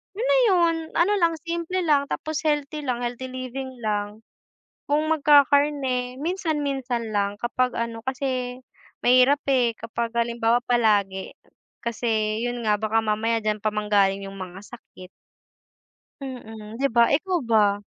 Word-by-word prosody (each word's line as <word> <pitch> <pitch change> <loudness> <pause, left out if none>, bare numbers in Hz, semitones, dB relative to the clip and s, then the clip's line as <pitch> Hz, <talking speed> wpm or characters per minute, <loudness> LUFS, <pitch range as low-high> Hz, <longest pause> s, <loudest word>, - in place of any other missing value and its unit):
yun 445 - -3
na - - +5
yun. 345 -4 +3 0.2
Ano 375 +5 +3
lang 335 -1 +2
simple 340 +2 -2
lang 285 -3 +2
tapos 310 -1 -3
healthy 295 0 -1
lang 245 -1 -1
healthy 245 +2 -4
living 255 +1 -6
lang. 210 +1 -3 0.7
Kung 300 +2 +2
magkakarne, 285 -4 +3
minsan-minsan 280 - -2
lang, 200 0 0
kapag 250 +1 0
ano, 230 -1 -3
kasi 255 -1 -2 0.5
mahirap 255 +3 +5
eh, 245 -3 +3
kapag 230 +1 -4
halimbawa 235 0 +2
palagi, 205 -5 +1 0.5
kasi 220 -2 -1
yun 245 0 -3
nga, 210 -1 +3
baka 220 +1 +1
mamaya 220 +2 0
diyan 215 0 0
pa 215 - +2
manggaling 200 -2 +2
yung 195 0 -9
mga 185 0 -7
sakit. 185 -6 -13 1.1
Mm, 225 -4 -8
'di 275 - +3
ba, 235 - +7
ikaw 360 +5 +1
ba? 205 -3 +2
245 Hz, 135 wpm, -24 LUFS, 220-285 Hz, 1.1 s, ba